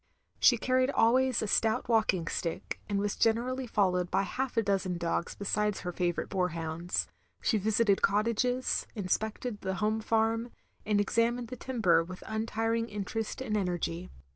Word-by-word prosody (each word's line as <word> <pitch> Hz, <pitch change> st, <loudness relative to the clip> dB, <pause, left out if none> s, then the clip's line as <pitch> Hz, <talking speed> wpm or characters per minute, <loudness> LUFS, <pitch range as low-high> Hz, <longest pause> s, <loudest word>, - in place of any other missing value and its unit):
She 245 Hz, -, +6 dB
carried 255 Hz, +2 st, +2 dB
always 255 Hz, -1 st, +3 dB
a -, -, -2 dB
stout 220 Hz, +4 st, +1 dB
walking 215 Hz, -7 st, +2 dB
stick, 170 Hz, 0 st, -4 dB
and 200 Hz, -, 0 dB
was 205 Hz, 0 st, -1 dB
generally 245 Hz, +3 st, +1 dB
followed 180 Hz, -5 st, +1 dB
by 190 Hz, +1 st, +2 dB
half 255 Hz, +4 st, -3 dB
a 225 Hz, -, +4 dB
dozen 195 Hz, -3 st, 0 dB
dogs 170 Hz, 0 st, -2 dB
besides 210 Hz, +1 st, -1 dB
her 180 Hz, -, -3 dB
favourite 175 Hz, -1 st, -1 dB
boarhounds. 170 Hz, -2 st, -1 dB, 0.3 s
She 220 Hz, -, +1 dB
visited 215 Hz, 0 st, +2 dB
cottages, 235 Hz, +5 st, +1 dB
inspected 215 Hz, +3 st, -2 dB
the 190 Hz, 0 st, -2 dB
home 215 Hz, +2 st, 0 dB
farm, 225 Hz, +1 st, +1 dB, 0.4 s
and 210 Hz, -1 st, +3 dB
examined 230 Hz, +3 st, +1 dB
the 255 Hz, -, -5 dB
timber 220 Hz, -10 st, +2 dB
with 180 Hz, +2 st, -9 dB
untiring 225 Hz, +1 st, -1 dB
interest 210 Hz, +3 st, -4 dB
and 215 Hz, -5 st, -2 dB
energy. 180 Hz, -2 st, -2 dB
215 Hz, 150 wpm, -30 LUFS, 185-230 Hz, 0.4 s, She